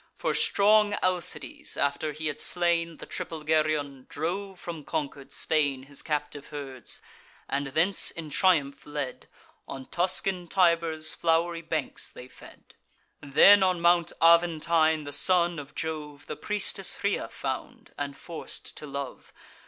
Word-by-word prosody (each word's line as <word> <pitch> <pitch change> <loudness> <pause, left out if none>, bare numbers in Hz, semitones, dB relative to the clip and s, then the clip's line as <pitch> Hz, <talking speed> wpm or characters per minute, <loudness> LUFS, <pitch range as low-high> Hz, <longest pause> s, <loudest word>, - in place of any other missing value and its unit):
For - - 0
strong 210 0 +4
Alcides, 175 -6 -2
after 140 +2 0
he 155 +2 -7
had 150 -2 -2
slain 170 -2 +1
The - - -9
triple 160 -2 -5
Geryon, 150 -4 0
drove 185 +5 -3
from 165 -3 -6
conquer'd 140 -3 -4
Spain 145 -4 0
His 140 +1 -3
captive 150 -2 -3
herds; 135 -4 -6 0.4
and, 140 0 -1
thence 165 +7 +1
in 160 -3 -8
triumph 145 -4 +2
led, 145 -3 -5 0.4
On 135 -1 -7
Tuscan 180 +1 +1
Tiber's 165 -3 +2
flow'ry 165 +1 +1
banks 160 -3 -2
they 125 - -11
fed. - - -16 0.5
Then 170 +8 +7
on 185 -2 +3
Mount 170 0 +4
Aventine 165 -1 +4
the 145 0 -6
son 175 +1 +2
of 145 0 -10
Jove 150 -2 -5
The - - -5
priestess 200 -2 -1
Rhea 200 - 0
found, - - -6
and 140 -1 -4
forc'd 170 -2 -8
to 150 - -6
love. 140 -1 -6
160 Hz, 135 wpm, -28 LUFS, 145-175 Hz, 0.5 s, Then